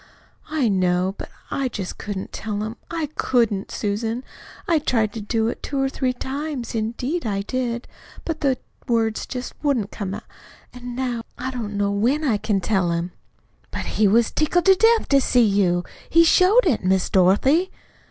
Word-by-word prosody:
"I 305 -6 +1
know 185 -2 +2
it. 195 - -9
But - - -6 0.2
I 275 -1 0
just 200 -6 -5
couldn't 200 -2 -5
tell 210 -1 -3
him 220 +2 -5
I 330 -2 -2
COULDN'T, 225 -6 +1
Susan. 220 +4 -2 0.4
I 330 -2 +3
tried 225 -7 0
to 225 - -5
do 225 +2 0
it 235 - -4
two 280 - -3
or 270 0 +1
three 260 -1 -1
times. 270 0 -4
Indeed, 240 +9 -2
I 200 -2 -1
did. 240 +1 -3 0.4
But 320 -1 -3
the 270 -3 +2 0.3
words 225 -2 0
just 250 -1 -5
wouldn't 255 -9 0
come. 200 -2 -4 0.5
And 245 -1 -7
now 250 -2 -2 0.2
I 260 +1 -3
don't 215 -5 -4
know 200 0 +1
when 245 +10 +1
I 240 -8 +2
can 205 -2 0
tell 190 -3 +1
him." 170 +1 -2 0.6
"But - - -5 0.2
he 210 - +6
was 225 +3 +3
tickled 340 +3 +1
to 385 - +8
death 450 +4 +4
to 275 -1 +5
see 245 -2 +4
you. 190 -4 +2 0.3
He 335 +1 +6
showed 375 +8 +5
it, 270 - +1
Miss 190 0 +2
Dorothy." 260 - +3
235 Hz, 180 wpm, -22 LUFS, 205-275 Hz, 0.6 s, to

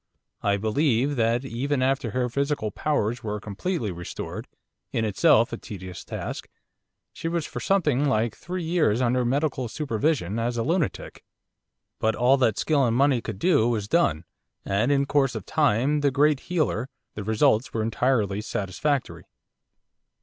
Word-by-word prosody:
I 100 -1 +1
believe 130 +5 +1
that, 115 +2 +1
even 135 +2 -1
after 130 -2 +1
her 125 +3 0
physical 140 -3 -1
powers 120 -3 -1
were 105 -1 -3
completely 110 - -3
restored 85 -1 -6 0.4
in 115 - 0
itself 110 +2 +3
a - - -2
tedious 95 -5 -8
task - - -6 0.7
she - - -5
was 165 -2 -1
for - - -6
something 150 -8 +2
like 115 -4 +1
three 180 0 -5
years 160 -10 +2
under 125 0 +2
medical 130 0 0
supervision 115 - -1
as 120 +1 -1
a 115 - 0
lunatic. 165 0 -2 0.8
But 110 0 +1
all 125 +3 +4
that 115 -6 +2
skill 150 -3 +2
and 120 -1 +2
money 135 -3 +3
could 110 -4 -6
do 145 - +3
was 105 -4 -1
done, 85 - +1 0.4
and 105 +7 +1
in 140 -1 +3
course 140 -3 +1
of 110 - -5
time 130 +8 +2
the 145 - +3
great 145 +1 +3
healer 150 -8 0 0.2
the 105 - -6
results 110 +3 +2
were 110 - -1
entirely 110 -3 +1
satisfactory. 120 +9 -2
125 Hz, 155 wpm, -25 LUFS, 110-145 Hz, 0.8 s, all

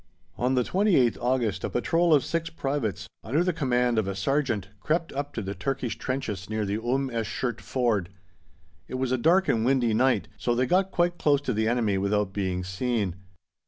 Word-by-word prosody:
On 125 +2 +1
the 125 - +3
28th 180 - +2
August 120 -6 0
a - - -1
patrol 165 +7 +1
of 145 -4 +5
six 165 0 -2
privates, 120 - -2 0.2
under 145 +10 +1
the 180 0 +1
command 125 -6 +1
of 105 - -1
a 100 - -2
sergeant, 115 -3 0
crept 165 - -1
up 145 +1 -3
to 110 - -3
the 95 +1 -4
Turkish 125 +4 -2
trenches 110 -8 -4
near 110 -1 -1
the 105 +3 -2
Umm 130 +2 0
esh 115 -2 -2
Shert 120 -3 -2
Ford. 115 -8 0 0.8
It - - -6
was 130 -1 -1
a 130 - +2
dark 180 +8 +4
and 110 - +2
windy 125 -3 +2
night, 130 +4 +2
so 120 - 0
they 125 +2 +2
got 185 +7 +2
quite 175 -1 0
close 145 -2 +3
to 130 -3 -2
the 110 +1 0
enemy 110 -5 +1
without 100 0 0
being 95 -2 -2
seen. 100 0 -1
125 Hz, 200 wpm, -26 LUFS, 105-140 Hz, 0.8 s, of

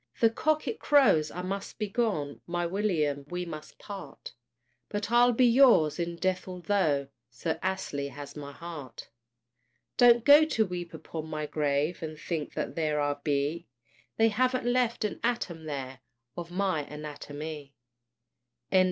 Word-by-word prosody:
The 230 -1 +5
cock 310 +6 0
it 445 - -3
crows 215 - +4
I 180 - -6
must 195 +2 -4
be 215 - -2
gone! 195 - -1
My 175 0 -1
William, 170 -7 0
we 180 0 -3
must 155 -3 -9
part! 195 -9 -9 0.6
But 205 +1 -3
I'll 240 +1 +6
be 250 +2 +4
yours 235 - +5
in 170 0 -2
death, 185 +1 -1
altho' 175 -6 0 0.2
Sir 145 +6 -3
Astley 170 -7 -2
has 145 0 -9
my 145 -1 -7
heart. 150 -5 -9 0.9
Don't 240 -1 +6
go 290 +2 +9
to 235 -8 +1
weep 175 -2 -6
upon 160 -1 -7
my 155 -1 -3
grave, 150 +2 0
And 155 -1 -5
think 160 -1 -4
that - - -3
there 155 -2 0
I 145 0 +1
be; 145 +4 -1 0.5
They 225 0 +5
haven't 255 +3 +1
left 245 -2 +1
an 210 - -3
atom 195 -9 -2
there 135 -3 -5 0.4
Of 170 -1 -6
my 185 -2 0
anatomie. 150 -1 -7 1.0
THE - - +4
WIDOW. - - +8
175 Hz, 155 wpm, -29 LUFS, 150-215 Hz, 1.0 s, go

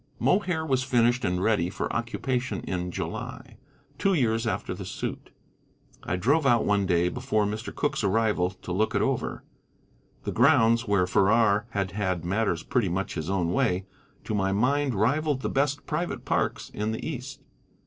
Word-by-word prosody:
Mohair 180 -5 +1
was 130 -4 +1
finished 120 -1 +2
and 90 -1 0
ready 100 -6 +2
for - - -3
occupation 120 -2 -2
in 90 -1 -3
July, - - -6 0.4
two 195 -1 +3
years 115 -5 +1
after - - -2
the - - -7
suit. - - -5 0.7
I 90 - -2
drove 140 - +2
out 120 -3 +4
one 100 -2 +2
day 85 0 +3
before 110 0 0
Mr. 105 +3 -4
Cooke's 145 - -1
arrival 105 -3 +2
to 95 -1 -9
look 105 +5 0
it - - +2
over. - - -2 0.8
The - - -3
grounds, 115 -3 +4
where 100 -3 +3
Farrar 105 +2 +3
had 100 -4 -2
had 95 -4 -2
matters 95 -3 0
pretty 115 -7 0
much 95 +3 -2
his 80 +2 -4
own 90 -3 0
way, 90 +1 +1 0.4
to - - -4
my 95 -2 +1
mind 130 +5 +1
rivalled 135 +6 +1
the - - 0
best 145 +1 0
private 170 +3 -3
parks - - -1
in 105 +1 -2
the 110 - -4
East. 140 -1 -6
110 Hz, 170 wpm, -27 LUFS, 95-130 Hz, 0.8 s, out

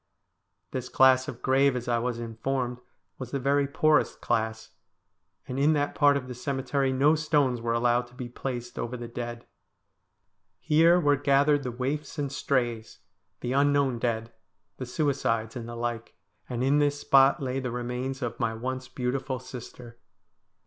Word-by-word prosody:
This 130 -1 -4
class 130 0 +5
of 125 -5 -8
grave, 135 0 +3
as 125 0 -4
I 120 -1 +1
was 120 0 -2
informed, 120 +2 -3 0.4
was 130 -2 -6
the 140 - -2
very 140 +1 +2
poorest 155 +1 +2
class, 110 -1 -2 0.8
and 130 +1 -4
in 150 +3 +4
that 145 -1 0
part 145 -2 +4
of 130 -2 -6
the 125 - -6
cemetery 135 +1 -1
no 140 +4 +4
stones 145 -6 +1
were 115 0 -1
allowed 120 +1 +2
to 120 - -20
be 125 -1 -6
placed 120 0 -6
over 125 +2 -3
the 120 0 -6
dead. 120 0 -6 1.1
Here 165 +3 +4
were 145 -4 +3
gathered 145 +1 +3
the 130 - -4
waifs 140 +5 -3
and 140 -2 -2
strays; 120 -5 -1 0.4
the 125 - -2
unknown 140 -3 +2
dead; 115 -1 -2 0.5
the 130 - -6
suicides, 125 -6 -1
and 120 -2 -6
the 120 - -6
like; 115 -1 -4 0.3
and 125 0 -2
in 140 +3 +3
this 145 -1 +1
spot 135 -1 +5
lay 130 -1 -2
the 130 -1 -3
remains 125 +2 -4
of 120 - -4
my 115 -1 0
once 130 +2 -4
beautiful 130 +1 -2
sister. 125 -2 -10
130 Hz, 165 wpm, -27 LUFS, 120-140 Hz, 1.1 s, class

